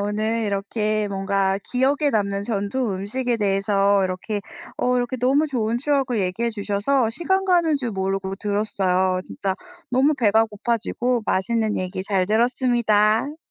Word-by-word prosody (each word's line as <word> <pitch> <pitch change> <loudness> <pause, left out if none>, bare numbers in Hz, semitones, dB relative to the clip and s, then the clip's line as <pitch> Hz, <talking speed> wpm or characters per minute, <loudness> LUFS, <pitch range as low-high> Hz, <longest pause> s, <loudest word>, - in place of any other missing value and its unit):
오늘 215 +3 -1
이렇게 210 +1 -1
뭔가 195 0 0
기억에 280 +3 +1
남는 200 -1 0
전통 215 +2 -1
음식에 235 +5 -2
대해서 200 -1 +2
이렇게 185 +3 -3 0.4
어 250 0 +1
이렇게 245 +1 -1
너무 270 +5 +2
좋은 235 -5 -1
추억을 270 -5 0
얘기해 190 +6 -1
주셔서 220 +4 0
시간 380 +8 0
가는 345 -5 +3
줄 250 -4 -3
모르고 195 0 -2
들었어요. 190 -3 0
진짜 190 -1 -3 0.4
너무 270 +4 +3
배가 225 -3 +3
고파지고 235 +2 -1
맛있는 220 +3 0
얘기 185 0 -3
잘 190 -3 +1
들었습니다. 235 +2 +2
215 Hz, 325 characters per minute, -22 LUFS, 200-250 Hz, 0.4 s, 가는